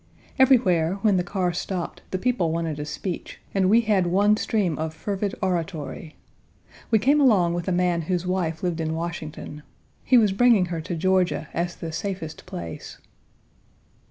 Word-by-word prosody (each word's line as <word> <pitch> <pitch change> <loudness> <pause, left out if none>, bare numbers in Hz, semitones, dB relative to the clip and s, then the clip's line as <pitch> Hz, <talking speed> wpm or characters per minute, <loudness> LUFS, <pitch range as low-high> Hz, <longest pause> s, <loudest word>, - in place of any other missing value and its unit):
Everywhere, 195 -11 +4
when 205 -4 +4
the 180 - +1
car 180 -1 -1
stopped, 180 0 -4
the 185 - -2
people 210 -6 0
wanted 165 -2 -2
a 150 - -3
speech, 170 +4 -5
and 190 -1 +2
we 225 +3 +6
had 205 -5 +2
one 200 +4 +4
stream 200 -7 -1
of 160 0 -3
fervid 200 +3 -3
oratory. 165 -4 -3 0.7
We 225 - +5
came 280 +8 +3
along 195 -10 +4
with 175 +1 -3
a - - +1
man 175 -1 +1
whose 180 +2 -2
wife 180 -3 -2
lived 170 -2 -1
in 160 0 -2
Washington. 160 -3 -6 0.4
He 255 - +5
was 215 -4 +4
bringing 220 -2 +4
her 165 - -3
to 170 +2 -4
Georgia 185 +1 +1
as 175 0 -2
the 165 - -6
safest 180 -2 -5
place. 85 -2 -7
180 Hz, 165 wpm, -24 LUFS, 165-200 Hz, 0.7 s, we